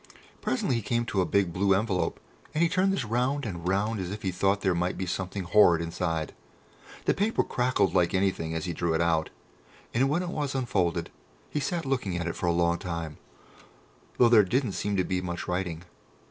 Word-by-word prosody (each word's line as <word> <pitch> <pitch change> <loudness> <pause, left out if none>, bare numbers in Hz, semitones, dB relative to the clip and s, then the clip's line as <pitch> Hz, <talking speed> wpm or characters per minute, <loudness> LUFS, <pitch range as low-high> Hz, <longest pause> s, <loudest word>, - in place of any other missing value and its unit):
Presently 200 - 0
he - - -2
came 120 +2 0
to 100 -4 0
a 90 - 0
big 100 -4 +1
blue 95 +1 +3
envelope, 95 -2 -1 0.4
and 160 - +3
he 170 - +3
turned 190 +1 +2
this 195 -10 -1
round 125 +5 0
and 90 -5 -5
round 100 +3 0
as 90 -2 -3
if 105 +2 -6
he 95 - 0
thought 95 +3 +1
there 95 -2 +2
might 90 +1 -1
be 95 - -2
something 95 +1 -3
horrid 85 -2 +5
inside. 80 -1 -2 0.7
The - - +3
paper 210 +3 +1
crackled 125 +1 +1
like 90 0 +2
anything 95 -4 0
as 80 - -2
he 85 - -2
drew 80 0 0
it 80 - +1
out, 80 -1 +1 0.6
and 130 +3 +2
when 170 +5 +1
it 180 - -4
was 145 -5 -2
unfolded 90 -10 0 0.4
he 150 - -1
sat 165 +3 -2
looking 125 -10 -1
at 85 - -2
it 85 - -3
for 90 - -2
a - - +4
long 85 0 +2
time, 85 -4 -5 1.0
though 120 - +6
there 115 -2 +8
didn't 120 +4 0
seem 100 +1 -2
to 95 - +3
be 90 0 -1
much 90 -1 -4
writing. 90 -2 -2
95 Hz, 210 wpm, -28 LUFS, 85-120 Hz, 1.0 s, there